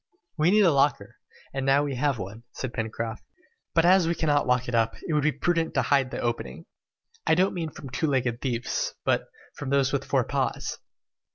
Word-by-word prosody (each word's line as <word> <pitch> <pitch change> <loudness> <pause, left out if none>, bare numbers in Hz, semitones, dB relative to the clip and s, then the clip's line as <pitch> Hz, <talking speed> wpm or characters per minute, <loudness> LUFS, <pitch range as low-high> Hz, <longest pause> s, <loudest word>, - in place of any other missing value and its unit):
"We 160 +1 +3
needed 210 +1 +5
a 170 - +5
locker, 140 0 +1 0.4
and 135 0 -2
now 135 +2 +4
we 145 -2 -2
have 135 +1 0
one," 100 +3 -7
said 130 -2 -5
Pencroft; 110 0 -4 0.5
"but 165 0 +4
as 180 -1 +5
we 170 - +1
cannot 145 -4 +1
lock 125 0 +2
it 120 - -4
up, 115 -1 +2
it 160 - -1
will 150 - +3
be 155 +2 +2
prudent 165 +3 0
to 135 - +3
hide 135 +1 +2
the - - -5
opening. 115 - -3 0.6
I 160 - +5
don't 185 +3 +2
mean 165 -3 -3
from 140 -3 -10
two 130 +5 0
legged 125 -4 0
thieves, 120 -2 -2
but; - - +1 0.3
from 140 - -6
those 140 -1 +2
with - - 0
four - - +2
paws!" - - -2
135 Hz, 205 wpm, -26 LUFS, 120-160 Hz, 0.6 s, needed